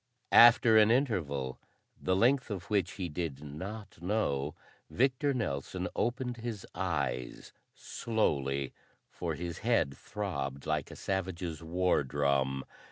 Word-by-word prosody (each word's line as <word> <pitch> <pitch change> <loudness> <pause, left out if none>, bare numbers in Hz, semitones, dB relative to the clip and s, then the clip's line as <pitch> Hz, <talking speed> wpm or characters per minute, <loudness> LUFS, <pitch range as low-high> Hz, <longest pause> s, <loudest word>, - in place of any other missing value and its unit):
After 115 -1 +8
an 105 0 +6
interval, 80 - 0 0.4
the 95 - +1
length 125 +6 +3
of 100 -2 -6
which 100 -2 +1
he 95 -4 -3
did 75 -3 -4
not 95 +6 -8
know, 80 -8 0 0.3
Victor 135 +3 +2
Nelson 70 - -2
opened 125 0 -1
his 115 -4 -5
eyes 70 -9 -3 0.2
slowly, 70 - -1 0.4
for - - -3
his 85 -1 -5
head 105 - +1
throbbed 70 -9 -4
like 75 -2 -1
a - - -9
savage's 90 -4 -3
war 90 0 +1
drum. 70 -1 0
90 Hz, 120 wpm, -31 LUFS, 70-110 Hz, 0.4 s, After